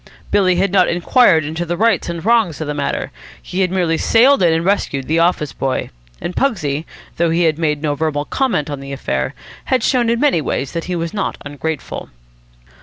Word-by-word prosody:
Billy 190 -3 +3
had 190 +1 +1
not 185 -2 +4
inquired 175 - +3
into 160 +3 -3
the 175 0 -3
rights 220 -3 +2
and 170 +1 -5
wrongs 225 -9 +2
of 155 - -3
the 150 - -3
matter: 145 -1 -2 0.3
he 185 - -6
had 185 -1 +2
merely 175 -3 0
sailed 260 +5 +4
in 175 -2 +4
and 165 +1 0
rescued 145 -9 0
the 160 +2 +2
office 165 -4 +1
boy. 135 -1 -2 0.3
And 180 - -5
Pugsy, 165 - 0 0.3
though 170 0 +2
he 170 +2 +2
had 160 -1 +1
made 150 -2 0
no 150 -1 +1
verbal 145 -1 -1
comment 195 - 0
on 145 - -4
the 140 0 -7
affair, 65 - -2 0.3
had 255 -3 +1
shown 245 -2 +2
in 235 0 +1
many 280 - +3
ways 135 -2 -2
that 165 - -4
he 180 - -3
was 170 +2 -3
not 205 - -2
ungrateful. 145 +1 -5
170 Hz, 205 wpm, -18 LUFS, 150-195 Hz, 0.3 s, not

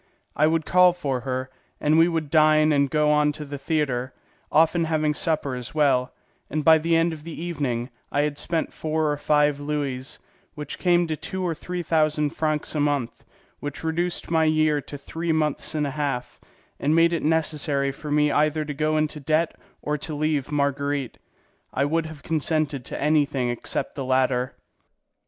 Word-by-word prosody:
I 150 - +4
would 160 -1 +1
call 180 0 +5
for 140 -7 -2
her, 130 +1 -4 0.3
and 150 +1 +2
we 165 +1 +6
would 160 -4 -2
dine 155 -1 +5
and 140 -1 +2
go 150 +1 +2
on 150 0 +3
to 150 0 -7
the 140 0 -7
theatre, 135 -5 -1 0.4
often 165 +1 +3
having 155 -1 +1
supper 155 -5 -1
as 125 +2 -6
well; 135 -4 +2 0.4
and 150 +1 -2
by 160 -1 +7
the 165 +1 +1
end 165 0 +2
of 155 -2 -9
the 165 -1 -8
evening 140 -8 -3 0.2
I 145 - +2
had 150 -1 -1
spent 165 -1 -2
four 155 -1 -1
or 145 - -1
five 145 -1 +2
louis, 145 -3 -3 0.4
which 150 -1 -7
came 175 -1 +3
to 160 -1 -2
two 190 +4 -5
or 170 - 0
three 180 +2 -5
thousand 155 -2 +1
francs 155 -2 -1
a 155 - -1
month, 145 -5 -1 0.4
which 145 +1 -6
reduced 170 +2 -1
my 160 -1 +3
year 155 -1 +2
to 145 - -9
three 165 +4 -3
months 155 -1 0
and 150 -1 +1
a 140 - -2
half, 135 -4 -3 0.4
and 150 +3 +2
made 165 +1 +4
it 170 - 0
necessary 150 -3 0
for 150 +2 -9
me 150 0 +3
either 155 +1 +1
to 150 - -4
go 155 +2 0
into 155 0 -1
debt 155 +3 0 0.3
or 150 0 -1
to 155 +1 -5
leave 150 -2 -1
Marguerite. 140 -2 -1 0.6
I 140 - +2
would 160 +2 0
have 155 -3 -11
consented 155 -3 0
to - - -5
anything 145 -4 +1
except 120 - -2
the 140 - -4
latter. 130 -1 +1
150 Hz, 185 wpm, -24 LUFS, 140-160 Hz, 0.6 s, by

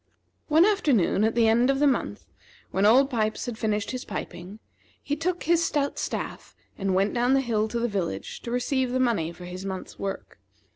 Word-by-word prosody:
One 320 +3 +5
afternoon, 285 - +2
at 220 +1 +1
the 230 -1 +4
end 235 +3 +4
of 275 - +2
the 295 - +3
month, 245 - 0 0.5
when 195 +2 +3
Old 260 +5 +6
Pipes 215 -3 -1
had 245 -3 -4
finished 215 -2 -1
his 255 -1 -4
piping, 185 0 -7 0.5
he 290 - -1
took 350 +3 -2
his 335 +1 +3
stout 285 -3 -1
staff - - -5 0.2
and 195 -1 -1
went 195 +2 +2
down 245 +2 +2
the - - +4
hill 225 -4 0
to 235 - -4
the 240 - +1
village 195 -6 -4
to - - -7
receive 250 +1 0
the 255 - +1
money 225 -11 +1
for 180 +1 -11
his 180 +1 -7
month's 190 -1 -6
work. 195 -1 -5
235 Hz, 200 wpm, -26 LUFS, 195-270 Hz, 0.5 s, Old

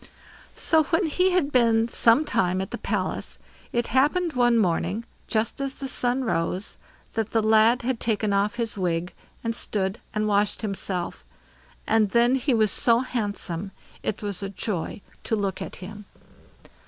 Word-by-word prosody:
So, 320 - +3
when 335 +4 +1
he 365 +4 +2
had 360 -6 +1
been 230 -3 +3
some 235 +5 +4
time 185 -8 +1
at 190 - -4
the - - -4
palace, - - -3 0.3
it 240 0 0
happened 310 +6 +2
one 240 -1 +3
morning, 190 +2 0 0.2
just 225 +4 -1
as 275 -1 -3
the 275 - -5
sun 250 0 -1
rose, 185 -3 -2 0.3
that 220 -1 -2
the 225 - +3
lad 220 +3 +4
had 250 -1 -1
taken 215 -2 0
off 200 +2 +1
his 230 -2 -2
wig, 175 -2 -1 0.3
and 230 -1 -1
stood 195 -2 -1 0.2
and 215 0 +1
washed 205 +1 +1
himself, 190 -3 -3 0.6
and 220 -2 +3
then 235 +3 +4
he 265 -1 +1
was 215 -2 +3
so 235 0 +4
handsome, 205 -7 -3 0.3
it 210 - -3
was 200 -2 -3
a 195 - -3
joy 195 -1 -3 0.2
to 225 - 0
look 200 -2 -2
at - - -6
him. 205 +1 -10
220 Hz, 165 wpm, -25 LUFS, 200-245 Hz, 0.6 s, some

